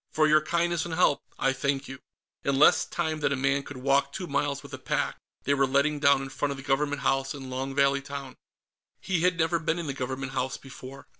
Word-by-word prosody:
"For 155 Hz, 0 st, +2 dB
your 155 Hz, 0 st, +5 dB
kindness 170 Hz, +1 st, 0 dB
and 170 Hz, -2 st, -4 dB
help, 160 Hz, -4 st, +3 dB, 0.2 s
I 135 Hz, -, +2 dB
thank 135 Hz, +1 st, -1 dB
you." 135 Hz, 0 st, -8 dB, 0.4 s
In 140 Hz, -1 st, +1 dB
less 150 Hz, -, +6 dB
time 160 Hz, -2 st, -2 dB
than 145 Hz, -, +1 dB
a -, -, +2 dB
man 140 Hz, +1 st, +1 dB
could 140 Hz, -1 st, -10 dB
walk 140 Hz, +2 st, +2 dB
two 180 Hz, -, -5 dB
miles 145 Hz, -4 st, -1 dB
with 140 Hz, 0 st, -12 dB
a 130 Hz, -, -6 dB
pack, -, -, -2 dB, 0.2 s
they 140 Hz, -, +2 dB
were 135 Hz, -1 st, +2 dB
letting 140 Hz, +3 st, +2 dB
down 140 Hz, -2 st, +4 dB
in 135 Hz, -, -6 dB
front 145 Hz, +1 st, -2 dB
of 140 Hz, -, -5 dB
the 135 Hz, -, -9 dB
Government 145 Hz, +1 st, 0 dB
House 135 Hz, +1 st, +1 dB
in 135 Hz, -2 st, -8 dB
Long 135 Hz, +1 st, -3 dB
Valley 140 Hz, 0 st, +3 dB
Town. 140 Hz, -2 st, -7 dB, 0.6 s
He 180 Hz, -4 st, -1 dB
had 180 Hz, 0 st, +2 dB
never 165 Hz, +1 st, +1 dB
been 165 Hz, +1 st, -1 dB
in 170 Hz, -, -4 dB
the 140 Hz, -, -3 dB
Government 130 Hz, +1 st, -4 dB
House 130 Hz, 0 st, -2 dB
before. 135 Hz, 0 st, -11 dB
140 Hz, 235 wpm, -27 LUFS, 135-155 Hz, 0.6 s, less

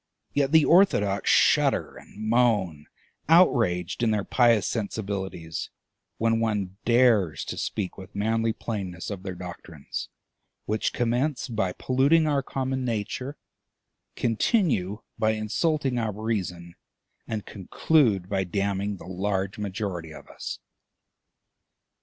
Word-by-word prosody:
Yet 140 Hz, -1 st, +1 dB
the 160 Hz, -2 st, +6 dB
orthodox 105 Hz, -, +3 dB
shudder -, -, +3 dB
and 110 Hz, +1 st, -9 dB
moan, 105 Hz, -10 st, +2 dB, 0.4 s
outraged 115 Hz, -, +3 dB
in 115 Hz, -, +3 dB
their 105 Hz, -2 st, +1 dB
pious 115 Hz, -4 st, +3 dB
sensibilities, 100 Hz, -6 st, -4 dB, 0.5 s
when 115 Hz, 0 st, +2 dB
one 105 Hz, -4 st, -1 dB
dares 115 Hz, -9 st, +3 dB
to -, -, -5 dB
speak 100 Hz, -2 st, -3 dB
with 95 Hz, +2 st, -12 dB
manly 115 Hz, +2 st, +1 dB
plainness 95 Hz, -6 st, -5 dB
of 100 Hz, -2 st, -5 dB
their 95 Hz, -2 st, -5 dB
doctrines, 90 Hz, -4 st, -7 dB, 0.6 s
which 110 Hz, +1 st, 0 dB
commence 125 Hz, +5 st, 0 dB
by 110 Hz, -7 st, -1 dB
polluting 140 Hz, -, +3 dB
our 145 Hz, -2 st, +2 dB
common 130 Hz, -1 st, -3 dB
nature, 125 Hz, +4 st, -3 dB, 0.8 s
continue 115 Hz, -, +1 dB, 0.2 s
by 110 Hz, 0 st, +3 dB
insulting 130 Hz, +5 st, 0 dB
our 110 Hz, -2 st, -1 dB
reason, 95 Hz, -5 st, -3 dB, 0.5 s
and 110 Hz, -2 st, -4 dB
conclude 105 Hz, -, +1 dB
by 95 Hz, -1 st, 0 dB
damning 100 Hz, +2 st, -2 dB
the 80 Hz, -, -12 dB
large 95 Hz, +1 st, -2 dB
majority 95 Hz, -5 st, -4 dB
of -, -, -12 dB
us! -, -, -6 dB
105 Hz, 115 wpm, -26 LUFS, 95-120 Hz, 0.8 s, the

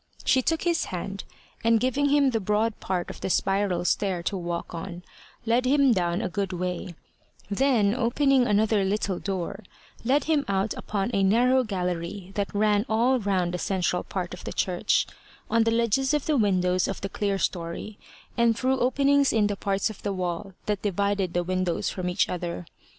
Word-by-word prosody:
She 260 Hz, -, +4 dB
took 325 Hz, +5 st, 0 dB
his 340 Hz, -2 st, +1 dB
hand, 195 Hz, +2 st, -5 dB, 0.4 s
and, 230 Hz, 0 st, +4 dB
giving 265 Hz, +4 st, +1 dB
him 280 Hz, -2 st, +4 dB
the 225 Hz, -, 0 dB
broad 210 Hz, +2 st, 0 dB
part 180 Hz, -2 st, -2 dB
of -, -, -12 dB
the -, -, -2 dB
spiral 195 Hz, -2 st, +1 dB
stair 185 Hz, -2 st, 0 dB
to 200 Hz, -, -1 dB
walk 175 Hz, -2 st, -4 dB
on, 175 Hz, +1 st, -6 dB, 0.4 s
led 240 Hz, +2 st, +2 dB
him 275 Hz, -1 st, +4 dB
down 175 Hz, +1 st, 0 dB
a -, -, 0 dB
good 190 Hz, +1 st, -3 dB
way; 180 Hz, -1 st, -4 dB, 0.6 s
then, 215 Hz, -3 st, +3 dB
opening 255 Hz, +2 st, +2 dB
another 210 Hz, 0 st, +2 dB
little 195 Hz, -1 st, -1 dB
door, 195 Hz, +1 st, -4 dB, 0.4 s
led 270 Hz, +5 st, +2 dB
him 305 Hz, -3 st, +1 dB
out 195 Hz, +1 st, 0 dB
upon 205 Hz, +2 st, -3 dB
a 200 Hz, -, +2 dB
narrow 245 Hz, +6 st, +4 dB
gallery 180 Hz, -2 st, -3 dB
that 200 Hz, -1 st, -2 dB
ran 205 Hz, 0 st, +3 dB
all 240 Hz, +4 st, +3 dB
round 190 Hz, -4 st, 0 dB
the 180 Hz, -, -2 dB
central 180 Hz, -1 st, 0 dB
part 180 Hz, -2 st, -4 dB
of 180 Hz, -, -9 dB
the -, -, -5 dB
church, 180 Hz, -2 st, +1 dB, 0.5 s
on 230 Hz, 0 st, +3 dB
the -, -, +3 dB
ledges 235 Hz, +5 st, +2 dB
of 295 Hz, -, -1 dB
the 310 Hz, -, +1 dB
windows 185 Hz, -5 st, +2 dB
of 195 Hz, -, -4 dB
the 195 Hz, -, -2 dB
clerestory, 195 Hz, 0 st, -2 dB, 0.4 s
and 235 Hz, -1 st, +3 dB
through 260 Hz, +1 st, +1 dB
openings 280 Hz, +2 st, +3 dB
in 220 Hz, -2 st, +3 dB
the 205 Hz, 0 st, 0 dB
parts 200 Hz, +2 st, -1 dB
of 210 Hz, -, -13 dB
the 205 Hz, -, -2 dB
wall 185 Hz, +1 st, -4 dB
that 210 Hz, -2 st, -1 dB
divided 200 Hz, -2 st, 0 dB
the 175 Hz, -, +2 dB
windows 185 Hz, -1 st, -1 dB
from 180 Hz, -1 st, -3 dB
each 180 Hz, +3 st, +1 dB
other. 175 Hz, 0 st, -4 dB
200 Hz, 185 wpm, -26 LUFS, 185-235 Hz, 0.6 s, She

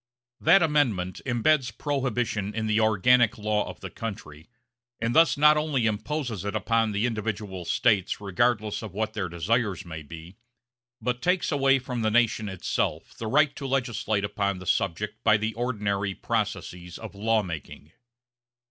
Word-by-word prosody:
That 175 Hz, +3 st, +5 dB
Amendment 120 Hz, -, +1 dB
imbeds 125 Hz, +2 st, +2 dB
Prohibition 120 Hz, -7 st, -1 dB
in 110 Hz, -1 st, -1 dB
the 110 Hz, 0 st, +2 dB
organic 115 Hz, +3 st, +4 dB
law 105 Hz, 0 st, -1 dB
of -, -, -10 dB
the -, -, -7 dB
country, 80 Hz, -8 st, -7 dB, 0.5 s
and 115 Hz, +1 st, -1 dB
thus 165 Hz, -2 st, +5 dB
not 150 Hz, +1 st, +6 dB
only 150 Hz, -6 st, 0 dB
imposes 110 Hz, -, -2 dB
it 100 Hz, +1 st, -3 dB
upon 115 Hz, 0 st, +1 dB
the 105 Hz, +3 st, 0 dB
individual 105 Hz, -5 st, -3 dB
States 100 Hz, 0 st, +1 dB
regardless 105 Hz, +2 st, 0 dB
of 105 Hz, -5 st, -8 dB
what 110 Hz, 0 st, -2 dB
their 100 Hz, -5 st, -3 dB
desires 95 Hz, +4 st, -1 dB
may 80 Hz, -2 st, -7 dB
be, 80 Hz, +5 st, -11 dB, 0.6 s
but 125 Hz, +2 st, -2 dB
takes 180 Hz, 0 st, +1 dB
away 135 Hz, -2 st, +4 dB
from 125 Hz, -2 st, -4 dB
the 110 Hz, -, +2 dB
nation 110 Hz, -2 st, +2 dB
itself 95 Hz, -2 st, -2 dB
the 115 Hz, -, -6 dB
right 145 Hz, +4 st, +3 dB
to 140 Hz, -, -5 dB
legislate 120 Hz, -6 st, -1 dB
upon 100 Hz, -2 st, -1 dB
the 95 Hz, -, -9 dB
subject 100 Hz, +3 st, -1 dB
by 110 Hz, -, +5 dB
the 110 Hz, +1 st, -2 dB
ordinary 100 Hz, -5 st, -2 dB
processes 90 Hz, +1 st, -3 dB
of -, -, -9 dB
law 110 Hz, +2 st, +1 dB
making. 80 Hz, -3 st, -8 dB
110 Hz, 155 wpm, -26 LUFS, 100-125 Hz, 0.6 s, not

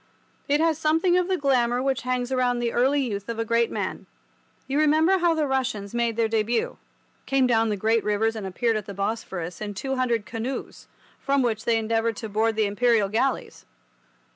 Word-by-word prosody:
It 290 Hz, +1 st, +2 dB
has 320 Hz, -1 st, +2 dB
something 325 Hz, +3 st, +2 dB
of 360 Hz, -1 st, +2 dB
the 380 Hz, -1 st, 0 dB
glamour 250 Hz, -4 st, +2 dB
which 265 Hz, +1 st, 0 dB
hangs 255 Hz, 0 st, -2 dB
round 250 Hz, -1 st, +1 dB
the 240 Hz, -1 st, -1 dB
early 270 Hz, +4 st, +2 dB
youth 205 Hz, -5 st, -4 dB
of 230 Hz, -, -3 dB
a 225 Hz, -, -1 dB
great 230 Hz, +1 st, +2 dB
man. -, -, -4 dB, 0.6 s
You 275 Hz, +2 st, 0 dB
remember 315 Hz, +5 st, +4 dB
how 340 Hz, -2 st, +3 dB
the 310 Hz, -1 st, +1 dB
Russians 250 Hz, -7 st, -2 dB
made 235 Hz, -1 st, 0 dB
their 230 Hz, -1 st, +2 dB
debut—came 230 Hz, +4 st, -2 dB
down 225 Hz, -2 st, +2 dB
the 210 Hz, -, -1 dB
great 220 Hz, +3 st, +1 dB
rivers 215 Hz, +2 st, 0 dB
and 210 Hz, -3 st, -5 dB
appeared 225 Hz, +4 st, 0 dB
at 210 Hz, -, -6 dB
the 200 Hz, -, -7 dB
Bosphorus 190 Hz, -4 st, -4 dB
in 205 Hz, -1 st, -5 dB
two 265 Hz, +7 st, -3 dB
hundred 235 Hz, -4 st, 0 dB
canoes, 235 Hz, +3 st, -6 dB, 0.3 s
from 275 Hz, -1 st, +1 dB
which 220 Hz, -3 st, -1 dB
they 230 Hz, -1 st, +3 dB
endeavoured 225 Hz, 0 st, 0 dB
to 220 Hz, +1 st, -6 dB
board 220 Hz, +2 st, +1 dB
the 215 Hz, -1 st, +2 dB
Imperial 210 Hz, 0 st, +2 dB
galleys. 240 Hz, +5 st, -2 dB
235 Hz, 190 wpm, -25 LUFS, 220-270 Hz, 0.6 s, remember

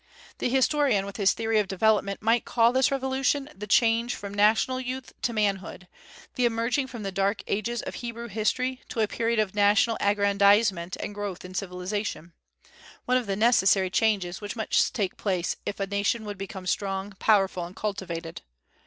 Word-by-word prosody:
The -, -, 0 dB
historian 265 Hz, -5 st, +2 dB
with 200 Hz, 0 st, -8 dB
his 200 Hz, -2 st, +3 dB
theory 225 Hz, -1 st, 0 dB
of 210 Hz, -, 0 dB
development 200 Hz, +1 st, +1 dB
might 225 Hz, +1 st, +3 dB
call 235 Hz, 0 st, +3 dB
this 260 Hz, 0 st, +3 dB
revolution 270 Hz, +1 st, 0 dB
the 210 Hz, +1 st, -7 dB
change 230 Hz, +3 st, +3 dB
from 200 Hz, 0 st, -8 dB
national 220 Hz, +5 st, +3 dB
youth 255 Hz, 0 st, -6 dB
to 240 Hz, -, 0 dB
manhood, 200 Hz, -4 st, -2 dB, 0.5 s
the 250 Hz, -, +1 dB
emerging 230 Hz, +4 st, 0 dB
from 240 Hz, -4 st, -8 dB
the 195 Hz, -, -3 dB
dark 195 Hz, +2 st, 0 dB
ages 230 Hz, +4 st, -2 dB
of -, -, -6 dB
Hebrew 235 Hz, 0 st, -6 dB
history 250 Hz, +5 st, -1 dB
to 225 Hz, -, -2 dB
a 215 Hz, -, +2 dB
period 230 Hz, +2 st, -1 dB
of 215 Hz, -3 st, +1 dB
national 210 Hz, +2 st, +3 dB
aggrandizement 200 Hz, -2 st, +3 dB
and -, -, -5 dB
growth 205 Hz, -3 st, -5 dB
in 180 Hz, -, -9 dB
civilization, 180 Hz, -1 st, -4 dB, 0.7 s
one 250 Hz, -, +3 dB
of 250 Hz, -4 st, -3 dB
the 195 Hz, -, -1 dB
necessary 195 Hz, -4 st, +3 dB
changes 190 Hz, -3 st, 0 dB
which 205 Hz, +2 st, -5 dB
must 220 Hz, -2 st, +1 dB
take 200 Hz, -5 st, -2 dB
place 185 Hz, -4 st, -1 dB
if 205 Hz, -, -4 dB
a 195 Hz, -, 0 dB
nation 200 Hz, +3 st, -1 dB
would 205 Hz, -2 st, -6 dB
become 195 Hz, -1 st, -7 dB
strong, 195 Hz, +1 st, -2 dB
powerful, 195 Hz, -4 st, +2 dB
and 175 Hz, +2 st, -9 dB
cultivated. 175 Hz, -5 st, -5 dB
210 Hz, 175 wpm, -26 LUFS, 195-235 Hz, 0.7 s, his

